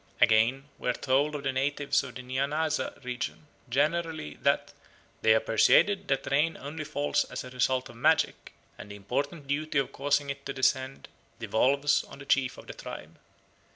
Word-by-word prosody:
Again, 120 Hz, +6 st, +4 dB
we -, -, -2 dB
are -, -, +3 dB
told 140 Hz, +4 st, +1 dB
of 145 Hz, -, -5 dB
the 135 Hz, -, 0 dB
natives 140 Hz, +2 st, +1 dB
of 130 Hz, -3 st, -9 dB
the 125 Hz, -, -7 dB
Nyanaza 145 Hz, +3 st, -1 dB
region 125 Hz, +4 st, -5 dB, 0.2 s
generally 155 Hz, -, 0 dB
that -, -, +1 dB, 0.5 s
"they 110 Hz, 0 st, +5 dB
are -, -, +4 dB
persuaded 190 Hz, -, +3 dB
that 135 Hz, -, 0 dB
rain 150 Hz, +4 st, +2 dB
only 155 Hz, +2 st, -6 dB
falls 145 Hz, -1 st, 0 dB
as -, -, -6 dB
a 125 Hz, -, -10 dB
result 130 Hz, +1 st, 0 dB
of 120 Hz, -, -13 dB
magic, 155 Hz, +6 st, +1 dB, 0.3 s
and 105 Hz, -, -9 dB
the 100 Hz, -, -8 dB
important 140 Hz, -, -3 dB
duty 150 Hz, +2 st, -1 dB
of 135 Hz, -, +1 dB
causing 145 Hz, +1 st, 0 dB
it 140 Hz, 0 st, -8 dB
to 140 Hz, -, -3 dB
descend 130 Hz, 0 st, 0 dB, 0.3 s
devolves 140 Hz, +5 st, +2 dB
on -, -, -12 dB
the 135 Hz, -, -11 dB
chief 135 Hz, -2 st, +1 dB
of -, -, -11 dB
the -, -, -8 dB
tribe. -, -, -9 dB
140 Hz, 180 wpm, -28 LUFS, 130-145 Hz, 0.5 s, they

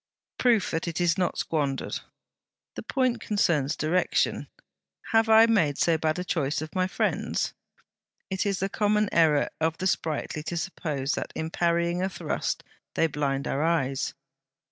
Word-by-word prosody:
'Proof 235 Hz, -6 st, +3 dB
that 165 Hz, +1 st, -2 dB
it 165 Hz, 0 st, -3 dB
is 175 Hz, -1 st, +3 dB
not 180 Hz, -2 st, 0 dB
squandered.' 140 Hz, -4 st, -1 dB, 0.7 s
'The -, -, -6 dB
point 255 Hz, -4 st, 0 dB
concerns 155 Hz, -9 st, +1 dB
direction.' 170 Hz, +4 st, +1 dB, 0.6 s
'Have 225 Hz, 0 st, +4 dB
I 220 Hz, +1 st, +8 dB
made 190 Hz, -11 st, +2 dB
so 170 Hz, -, +3 dB
bad 155 Hz, 0 st, 0 dB
a 180 Hz, -, -2 dB
choice 155 Hz, -5 st, -1 dB
of 155 Hz, +1 st, -6 dB
my 185 Hz, -1 st, +1 dB
friends?' -, -, -1 dB, 0.8 s
'It 190 Hz, -, 0 dB
is 195 Hz, -2 st, -1 dB
the 195 Hz, -, +1 dB
common 210 Hz, +1 st, +1 dB
error 155 Hz, -4 st, +3 dB
of 160 Hz, 0 st, 0 dB
the 185 Hz, -, -4 dB
sprightly 155 Hz, -4 st, -1 dB
to 170 Hz, +3 st, -4 dB
suppose 150 Hz, -6 st, -2 dB
that -, -, -3 dB
in 160 Hz, 0 st, -3 dB
parrying 170 Hz, +1 st, +1 dB
a 190 Hz, -, 0 dB
thrust 180 Hz, -, -3 dB, 0.3 s
they -, -, +3 dB
blind 140 Hz, -3 st, -1 dB
our 140 Hz, -, -1 dB
eyes.' 140 Hz, -5 st, 0 dB
170 Hz, 160 wpm, -27 LUFS, 155-190 Hz, 0.8 s, I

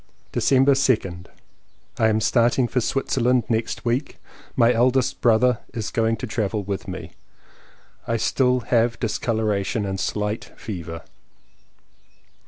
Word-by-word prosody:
December 135 Hz, +1 st, +3 dB
2nd. 105 Hz, -10 st, +1 dB, 0.7 s
I 110 Hz, -, +4 dB
am 110 Hz, 0 st, +1 dB
starting 120 Hz, +2 st, +2 dB
for 125 Hz, +1 st, 0 dB
Switzerland 125 Hz, -1 st, +1 dB
next 115 Hz, +1 st, -2 dB
week. 125 Hz, +4 st, -1 dB, 0.4 s
My 120 Hz, +1 st, +4 dB
eldest 125 Hz, +2 st, +1 dB
brother 120 Hz, 0 st, +3 dB, 0.2 s
is 110 Hz, -3 st, -3 dB
going 115 Hz, 0 st, +1 dB
to -, -, -5 dB
travel 105 Hz, -2 st, -2 dB
with 100 Hz, 0 st, -4 dB
me. -, -, -7 dB, 1.0 s
I -, -, 0 dB
have 115 Hz, -, -1 dB
still 125 Hz, -2 st, +2 dB, 0.4 s
discoloration 110 Hz, -2 st, -1 dB
and 95 Hz, -1 st, -3 dB
slight 105 Hz, +2 st, -3 dB
fever. 85 Hz, -5 st, -6 dB
115 Hz, 120 wpm, -23 LUFS, 105-125 Hz, 1.0 s, I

